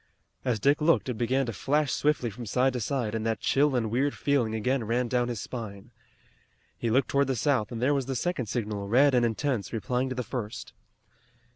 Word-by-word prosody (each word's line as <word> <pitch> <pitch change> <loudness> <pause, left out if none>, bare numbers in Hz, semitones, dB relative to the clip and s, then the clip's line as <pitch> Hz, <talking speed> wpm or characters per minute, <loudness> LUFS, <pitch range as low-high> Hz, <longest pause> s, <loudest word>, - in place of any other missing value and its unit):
As 125 -4 0
Dick 140 +7 +3
looked 155 -3 +3
it - - 0
began 130 +3 +1
to 115 - -4
flash 145 - 0
swiftly 145 -6 +1
from 115 +3 -8
side 130 +5 +2
to 125 - -2
side 120 -2 -2
and 110 -1 -2
that 110 -1 -1
chill 140 0 +2
and 115 -3 0
weird 135 +4 +1
feeling 125 -6 +1
again 125 +3 0
ran 120 +3 0
down 120 0 +1
his 120 -3 -3
spine. 100 -4 -7 0.8
He 115 - -2
looked 130 +5 +2
toward 140 0 +2
the 135 - 0
south 125 -5 +1
and 115 - -4
there 130 +5 +2
was 135 -3 -1
the 135 - -2
second 135 -3 -1
signal, 105 -3 -3
red 135 +6 +4
and 125 -1 +4
intense, 115 -2 -1
replying 125 +3 -1
to 130 - -4
the 125 - -2
first. 120 -1 -6
125 Hz, 215 wpm, -28 LUFS, 115-135 Hz, 0.8 s, red